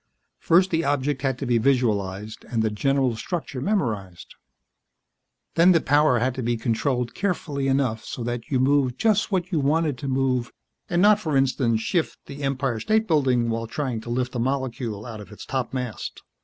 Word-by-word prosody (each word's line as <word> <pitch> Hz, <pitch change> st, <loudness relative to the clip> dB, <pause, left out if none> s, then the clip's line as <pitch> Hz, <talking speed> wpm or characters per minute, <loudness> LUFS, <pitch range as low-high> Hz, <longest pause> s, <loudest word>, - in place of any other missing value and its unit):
First 185 Hz, +3 st, +3 dB
the 165 Hz, -1 st, +1 dB
object 140 Hz, -1 st, 0 dB
had 135 Hz, -2 st, 0 dB
to 135 Hz, -, -4 dB
be 120 Hz, -2 st, +2 dB
visualized, 110 Hz, -5 st, 0 dB
and 115 Hz, -2 st, -1 dB
the 110 Hz, -, +1 dB
general 130 Hz, +3 st, +1 dB
structure 140 Hz, +2 st, -4 dB
memorized. 110 Hz, -, -2 dB, 1.2 s
Then 175 Hz, +2 st, +6 dB
the 165 Hz, -, +4 dB
power 145 Hz, -3 st, +3 dB
had 125 Hz, +2 st, +1 dB
to 130 Hz, -, -4 dB
be 120 Hz, 0 st, 0 dB
controlled 120 Hz, +2 st, -1 dB
carefully 150 Hz, -8 st, -2 dB
enough 135 Hz, -5 st, +1 dB
so 120 Hz, -, -6 dB
that 120 Hz, 0 st, -4 dB
you 130 Hz, -, +1 dB
moved 135 Hz, -1 st, +2 dB
just 215 Hz, -1 st, +2 dB
what 185 Hz, -1 st, -1 dB
you 165 Hz, -, +1 dB
wanted 145 Hz, -1 st, +1 dB
to 140 Hz, -, -5 dB
move 130 Hz, -2 st, 0 dB, 0.4 s
and 175 Hz, +1 st, +2 dB
not, 210 Hz, 0 st, +6 dB
for 155 Hz, -8 st, 0 dB
instance, 125 Hz, -4 st, +1 dB
shift 165 Hz, +7 st, -1 dB
the 140 Hz, +1 st, -9 dB
Empire 135 Hz, -4 st, -1 dB
State 220 Hz, -, +1 dB
Building 130 Hz, -7 st, +2 dB
while 115 Hz, 0 st, -2 dB
trying 125 Hz, -2 st, -3 dB
to 120 Hz, -, -9 dB
lift 125 Hz, +1 st, -1 dB
a 125 Hz, -, -2 dB
molecule 120 Hz, -4 st, -2 dB
out 110 Hz, -3 st, -7 dB
of 105 Hz, -, -12 dB
its 105 Hz, -, -10 dB
topmast. 125 Hz, -4 st, -4 dB
130 Hz, 185 wpm, -24 LUFS, 115-145 Hz, 1.2 s, Then